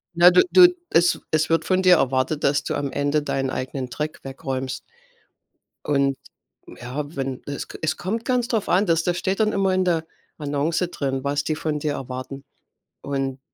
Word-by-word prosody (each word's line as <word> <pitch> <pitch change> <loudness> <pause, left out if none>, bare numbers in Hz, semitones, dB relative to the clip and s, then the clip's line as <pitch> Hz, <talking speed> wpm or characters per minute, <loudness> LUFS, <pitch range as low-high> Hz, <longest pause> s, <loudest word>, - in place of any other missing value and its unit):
Ne, 175 +1 +8
du 180 - +6
du 360 -1 +9 0.2
es 175 +1 +3
es 155 0 +1
wird 165 - +2
von 185 0 +1
dir 180 -1 +7
erwartet, 135 +2 0
dass 140 +1 +2
du - - -2
am 140 -1 -2
Ende 145 +1 0
deinen 135 -2 -1
eigenen 130 0 -4
Dreck 150 +4 -4
wegräumst. 135 -1 -4 1.0
Und 140 -2 +1 0.6
ja, 145 +5 -5
wenn 135 -1 -4
es 140 -1 -5
k - - -9
es 155 0 0
kommt 220 +5 -3
ganz 250 -1 0
drauf 225 -5 -1
an, 190 +4 +3
das 165 -2 +2
das 175 +1 -1
steht 190 +4 -1
dann 215 0 +3
immer 195 -1 +1
in 185 0 +2
der 165 -2 0 0.3
Annonce 150 +4 -1
drin, 135 -4 -3
was 145 +1 0
die 155 - -1
von 155 -2 -2
dir 150 0 -1
erwarten. 130 +1 -6 0.6
Und 135 -1 -3
150 Hz, 185 wpm, -23 LUFS, 135-175 Hz, 1.0 s, du